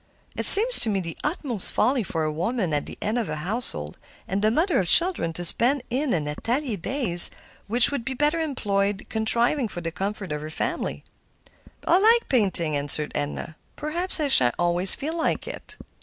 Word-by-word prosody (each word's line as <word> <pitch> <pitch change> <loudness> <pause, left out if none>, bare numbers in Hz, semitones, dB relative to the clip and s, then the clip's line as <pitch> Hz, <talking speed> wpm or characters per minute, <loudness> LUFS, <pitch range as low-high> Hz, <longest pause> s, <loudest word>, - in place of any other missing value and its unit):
"It - - -2
seems 470 +5 +8
to 225 - +6
me 200 -2 -1
the 170 -3 -7
utmost 280 - -3
folly 255 0 +1
for 165 -6 -4
a 155 0 -3
woman 180 +1 -3
at 145 - -2
the - - -10
head 220 +4 -1
of 230 - -4
a - - -3
household, 155 - -5 0.3
and 195 +2 -3
the 215 - +2
mother 330 - 0
of 185 - -2
children, 340 - +4
to 175 +2 -5
spend 250 +8 0
in 265 +2 -1
an 150 -4 -2
atelier 240 - -3
days 195 - 0 0.4
which 235 +4 +5
would 280 -5 -4
be 260 +2 -5
better 295 +5 0
employed 205 -10 -2
contriving 235 +4 0
for 175 -4 -8
the 165 0 -5
comfort 195 0 -5
of 150 0 -4
her 155 - -7
family." 155 - -4 0.8
"I - - 0
feel 360 +3 +4
like 460 +3 +3
painting," 185 - 0
answered 145 +1 +1
Edna. 150 +2 -5 0.2
"Perhaps 340 +4 +4
I 300 - 0
shan't 125 - +4
always 175 +2 +3
feel 310 +4 -5
like 330 - -2
it." - - -10
215 Hz, 195 wpm, -23 LUFS, 170-280 Hz, 0.8 s, seems